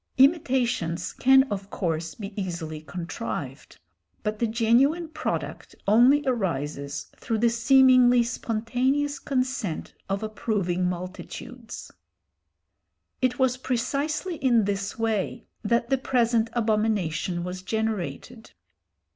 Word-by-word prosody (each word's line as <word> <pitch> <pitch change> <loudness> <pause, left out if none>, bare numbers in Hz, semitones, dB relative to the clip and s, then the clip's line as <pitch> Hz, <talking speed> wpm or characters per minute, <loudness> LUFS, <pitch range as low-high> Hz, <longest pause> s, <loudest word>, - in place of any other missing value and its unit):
Imitations 255 - +2
can 265 +1 +6
of 195 -1 -4
course 165 -4 -2
be 200 -1 -7
easily 170 -5 -4
contrived, 140 -5 -6 0.5
but 210 0 -2
the 235 - +2
genuine 245 +9 +3
product 315 - -4
only 245 +8 +6
arises 145 - -2
through 225 - -2
the 235 +1 +3
seemingly 250 0 +6
spontaneous 250 +5 -1
consent 255 - -2 0.2
of 195 +2 -1
approving 195 -5 -1
multitudes. 205 +6 -7 1.3
It 255 -1 +1
was 260 -1 +2
precisely 285 +8 -2
in 240 -6 +3
this 200 0 -2
way 225 -3 -1 0.2
that 235 +3 +1
the 270 - +3
present 235 -3 +2
abomination 210 -7 0
was 180 +1 -5
generated. 220 - -4
225 Hz, 105 wpm, -26 LUFS, 185-255 Hz, 1.3 s, can